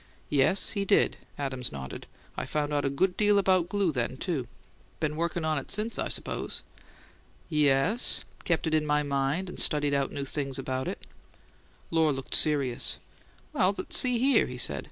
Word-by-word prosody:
"Yes, 145 +7 +2
he 200 -2 -2
did." 200 +1 +2 0.2
Adams 130 -3 -3
nodded. 65 -2 -8 0.3
"I - - -4
found 150 -1 -2
out 145 -1 0
a - - +2
good 180 +7 0
deal 205 -1 +3
about 185 -3 +2
glue 200 -4 +1
then, 125 -1 -2
too." 145 - -3 0.5
"Been 150 -1 -1
workin' 170 0 -2
on 155 -2 +1
it 135 - -11
since, 215 +3 -1
I - - 0
suppose?" - - -3 0.9
"Yes. 150 - +2 0.2
Kept 170 -1 0
it 160 - -1
in 155 -1 +1
my 150 0 +2
mind 140 +6 -1
and 180 - -6
studied 145 -2 +5
out 140 -1 0
new 140 -1 -4
things 135 -1 -3
about 130 -1 -3
it." - - -6 0.9
Lohr 160 -2 +3
looked 135 -1 -5
serious. 140 -5 +3 0.6
"Well, 185 +2 +2
but - - -6
see 250 -1 +4
here," 260 0 +3
he 125 - -7
said. 70 - +3
150 Hz, 175 wpm, -28 LUFS, 135-185 Hz, 0.9 s, studied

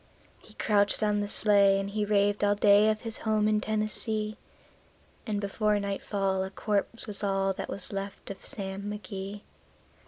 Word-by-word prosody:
He - - -17
crouched 205 0 +2
on 210 -1 +2
the 205 - -1
sleigh, 200 -2 +4
and 195 - -3
he 210 0 -1
raved 205 0 +2
all 205 0 +3
day 205 +1 +5
of 215 0 -1
his 225 -1 -2
home 215 -1 +1
in 215 0 +2
Tennessee; 215 0 -1 0.9
And 210 -2 -1
before 210 +1 0
nightfall 195 -1 -1
a 190 - -4
corpse 205 +3 -2
was 210 -1 -6
all 195 -1 +1
that - - -6
was 200 +1 -4
left 195 0 -5
of 195 - -10
Sam 195 0 -5
McGee. 200 0 -6
205 Hz, 165 wpm, -28 LUFS, 195-215 Hz, 0.9 s, day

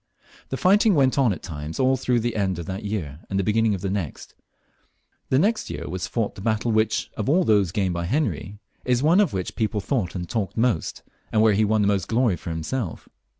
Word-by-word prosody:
The 135 - -3
fighting 200 - +4
went 135 -1 +3
on 130 -5 +4
at 90 - -5
times 75 -2 -6
all 130 0 +4
through 125 -2 0
the 120 0 -2
end 95 -4 0
of 85 - -5
that 95 +3 -5
year 90 -9 -4
and 95 - -1
the 100 - +1
beginning 110 +1 +2
of 95 - -7
the 100 - -2
next. 95 -7 -4 1.0
The 130 - +3
next 215 +9 +1
year - - -5
was 95 +2 -4
fought 110 0 -2
the 95 - -10
battle 110 +2 0
which, 110 0 +1
of 110 +3 -2
all 180 +5 +4
those 100 - +3
gained 95 -1 0
by 85 0 -2
Henry, 110 - -1 0.3
is 125 -1 +1
the - - 0
one 170 +5 +5
of 205 - +3
which 95 -2 -4
people 110 -2 -1
thought 100 -4 -2
and 90 -1 -4
talked 110 -1 -3
most, 115 -7 0 0.3
and 110 - +3
where 110 -1 +5
he 105 +2 +3
won 110 0 +2
the - - +2
most 100 -3 +1
glory 115 -4 +2
for 85 - -8
himself. 85 +5 -4
110 Hz, 235 wpm, -24 LUFS, 95-125 Hz, 1.0 s, one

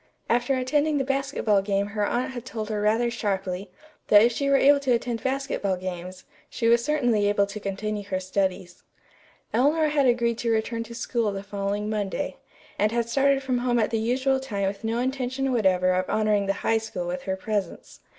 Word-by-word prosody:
After 245 +3 +2
attending 290 +4 +1
the 275 - +1
basketball 270 -6 +1
game 200 0 0
her 210 0 -2
aunt 245 +5 -1
had 245 -3 -7
told 225 -4 -5
her 210 -1 -1
rather 225 +3 +2
sharply 195 -4 -3 0.4
that 205 0 +7
if 235 - +4
she 275 +4 -1
were 275 - +5
able 280 +1 +5
to 265 -3 +1
attend 235 -1 -1
basketball 265 -7 -1
games, 185 0 -6 0.3
she 230 - -1
was 235 0 +4
certainly 245 -9 +2
able 205 -1 +2
to 200 +1 -7
continue 205 +1 -3
her 185 -2 -2
studies. 185 -1 -2 0.7
Eleanor 300 +6 +3
had 285 -3 +2
agreed 235 -1 +1
to 235 - -1
return 225 +1 0
to 235 +1 -10
school 230 -3 -1
the 195 0 -5
following 200 +1 -3
Monday, 210 -2 -3 0.4
and 210 +1 +2
had 235 0 -1
started 275 +2 +2
from 255 -2 0
home 245 0 +1
at 220 - +1
the 225 - 0
usual 260 +4 +1
time 205 -7 -3
with 200 +2 -5
no 225 +1 -1
intention 260 +1 -1
whatever 185 -5 +3
of 185 0 -1
honoring 210 -2 +1
the 195 - +2
High 225 0 +3
School 215 -5 -5
with 180 +1 -3
her 190 - +1
presence. 205 +1 -4
225 Hz, 200 wpm, -25 LUFS, 200-255 Hz, 0.7 s, that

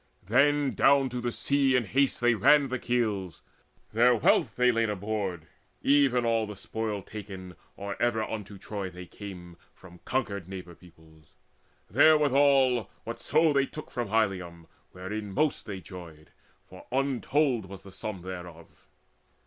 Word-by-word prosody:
Then 140 +6 +3
down 135 -1 +4
to 125 0 -4
the 120 0 -2
sea 140 +1 +1
in 125 -2 +2
haste 135 +5 +1
they 120 0 +4
ran 140 +6 +4
the 130 0 -2
keels: 105 -8 -2 0.5
Their 120 +2 +5
wealth 110 - +2
they 125 0 +4
laid 115 -1 +1
aboard, 100 -4 -3 0.4
even 135 -4 +3
all 115 -1 +1
the 105 - -7
spoil 105 0 -4
Taken, 95 -4 -9 0.2
or 100 0 -6
ever 120 -2 +1
unto 105 -2 -6
Troy 100 -1 -5
they 90 0 -10
came, 90 -3 -10 0.2
From 90 -2 -15
conquered 100 -8 -2
neighbour 90 -2 -8
peoples; 80 -3 -20 0.5
therewithal 140 - +4
Whatso 160 -2 +1
they 140 -1 +2
took 155 - -9
from 120 -1 -3
Ilium, 95 -6 -1 0.3
wherein 100 +3 -6
most 150 +7 0
They 100 -2 -5
joyed, 85 -5 -12 0.4
for 95 - -14
untold 135 -3 +1
was 95 0 -10
the 100 - -12
sum 95 -2 -6
thereof. 90 -3 -10
110 Hz, 145 wpm, -28 LUFS, 95-130 Hz, 0.5 s, Their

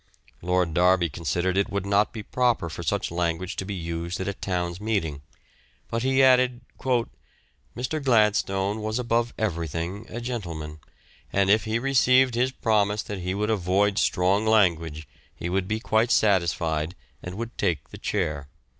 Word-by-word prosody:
Lord 90 -1 +1
Derby 90 0 +3
considered 85 +5 -1
it 100 - +2
would 100 -1 -2
not 100 +1 +2
be 110 -2 -7
proper 120 -8 0
for 85 - -6
such 100 +2 -1
language 85 +2 -2
to 95 - -3
be 100 0 -4
used 85 0 -4
at 95 - -3
a 100 - -1
Town's 90 -1 -3
meeting, 85 -10 -1 0.7
but 115 - -1
he 130 +1 +3
added, 125 -1 +4 1.2
"Mr. 140 +5 -2
Gladstone 105 -4 +2
was 110 +1 -2
above 120 -1 0
everything 85 +1 -3
a 120 - -5
gentleman, 85 -11 -5 0.5
and 100 0 +3
if 110 +1 +3
he 110 +1 0
received 130 0 +4
his 125 +2 +1
promise 105 -4 +1
that 100 -2 -6
he 90 +1 -3
would 105 +2 0
avoid 100 0 +1
strong 95 +3 +2
language 85 -8 +2 0.3
he 85 - -4
would 95 +1 0
be 110 +1 -1
quite 110 0 +1
satisfied 85 -6 +1 0.3
and 90 0 -7
would 115 +2 -6
take 85 -8 -1
the - - -10
chair." 75 -8 -2
100 Hz, 160 wpm, -25 LUFS, 85-110 Hz, 1.2 s, added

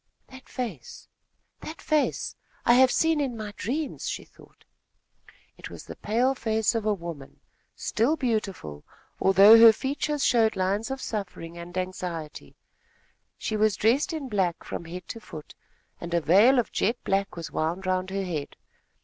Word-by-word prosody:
"That 260 0 -14
face 220 - -6 0.5
that 315 - -8
face! 305 -2 0 0.3
I 240 - +6
have 260 +1 +6
seen 320 +2 +2
in 255 -5 -2
my 210 -1 -6
dreams!" 280 +8 -3
she - - -4
thought. - - -21 0.9
It - - -8
was - - -10
the - - -9
pale 245 +5 +1
face 220 -3 0
of 225 -2 -2
a 215 - +3
woman, 165 -6 -9 0.4
still 240 +9 0
beautiful, 200 - -3 0.4
although 200 +4 +8
her 230 0 +10
features 280 +4 -2
showed 225 -3 +3
lines 195 +5 -1
of 265 0 -5
suffering 180 -5 -5
and 170 +1 -8
anxiety. 175 - -5 0.8
She 215 - -3
was 215 -1 +2
dressed 240 - +2
in 310 -4 -4
black 190 -7 -1
from 170 - -6
head 175 +1 -8
to 230 - -6
foot, 155 -8 -11 0.5
and 170 0 -4
a - - +4
veil 205 - +5
of 240 - 0
jet 230 +4 0
black 195 0 -1
was 170 -2 -7
wound 170 +4 -2
round 185 0 0
her 195 0 -2
head. 155 -6 -4
210 Hz, 160 wpm, -26 LUFS, 180-245 Hz, 0.9 s, her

